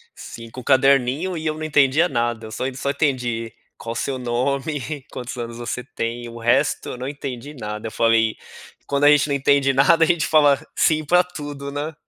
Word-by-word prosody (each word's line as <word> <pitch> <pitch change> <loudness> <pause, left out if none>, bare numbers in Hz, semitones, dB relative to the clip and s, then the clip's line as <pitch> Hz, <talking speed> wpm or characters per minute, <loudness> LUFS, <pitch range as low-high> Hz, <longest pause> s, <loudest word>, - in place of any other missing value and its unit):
5 115 +2 -9
caderninho 135 +6 +3
e 160 - -5
eu 155 - 0
não 155 - -6
entendia 150 +2 +3
nada, 120 -3 -2
eu - - -9
só 110 - -3
só 140 +1 -2
entendi 125 -6 -1 0.3
qual 115 - -5
o - - -8
seu 130 +2 -2
nome, 135 +3 -2
quantos 125 +1 -7
anos 115 -1 -5
você 120 +1 -4
tem, 120 -1 -5
o 115 0 -9
resto 125 +5 +1
eu 125 - -6
não 130 - -4
entendi 140 0 -7
nada, 105 -3 -6
eu - - -11
falei: 115 -1 +2 0.5
"Quando 140 +1 0
a 145 - +8
gente 150 0 +4
não 140 - 0
entende 140 0 +3
nada 160 +5 +5
a - - +1
gente 170 -2 +1
fala 145 -3 +4 0.2
sim 155 -1 +2
pra 180 +4 +4
tudo, 145 -5 -7
né?" 150 +3 -4
135 Hz, 200 wpm, -21 LUFS, 120-150 Hz, 0.5 s, a